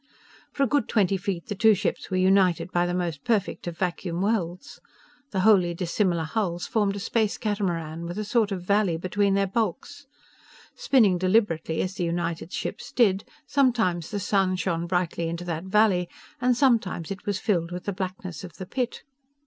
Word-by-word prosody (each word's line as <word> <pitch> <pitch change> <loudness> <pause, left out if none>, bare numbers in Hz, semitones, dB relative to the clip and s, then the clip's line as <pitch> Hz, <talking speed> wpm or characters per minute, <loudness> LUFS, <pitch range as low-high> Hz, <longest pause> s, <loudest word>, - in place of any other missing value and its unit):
For 275 - 0
a - - +3
good 285 -3 +1
twenty 195 -3 +2
feet 180 -2 -3
the - - -4
two 215 +2 +5
ships 195 0 -2
were 185 - -1
united 185 -2 +3
by 175 0 +1
the 175 - -2
most 170 -6 -3
perfect 210 -6 -1
of 170 -1 -5
vacuum 175 -1 -2
welds. 185 -4 -2 0.5
The 190 -6 -1
wholly 185 -4 +4
dissimilar 175 -1 0
hulls 175 0 -2
formed 205 -3 0
a - - -4
space 215 +1 0
catamaran, 170 -6 -2
with 175 +3 -6
a 215 - -1
sort 215 0 +1
of 185 -3 -3
valley 200 -3 +2
between 195 +3 +1
their 200 0 +2
bulks. 230 +8 -3 0.7
Spinning 210 -10 +3
deliberately, 185 -5 +1
as 185 - -3
the 190 - -3
united 170 0 -2
ships - - -5
did, 205 -5 +2 0.2
sometimes 235 - +1
the 205 - -3
sun 195 -1 +1
shone 170 -2 -1
brightly 175 -2 -1
into 170 +1 -4
that 170 0 -3
valley, 190 -3 +3 0.3
and 250 -1 +3
sometimes 220 - +1
it 195 +1 -7
was 205 -2 0
filled 175 -5 0
with 180 0 -5
the 200 - -3
blackness 185 -3 -5
of 175 -3 -9
the 185 - -8
pit. 245 +5 -3
185 Hz, 180 wpm, -26 LUFS, 175-210 Hz, 0.7 s, two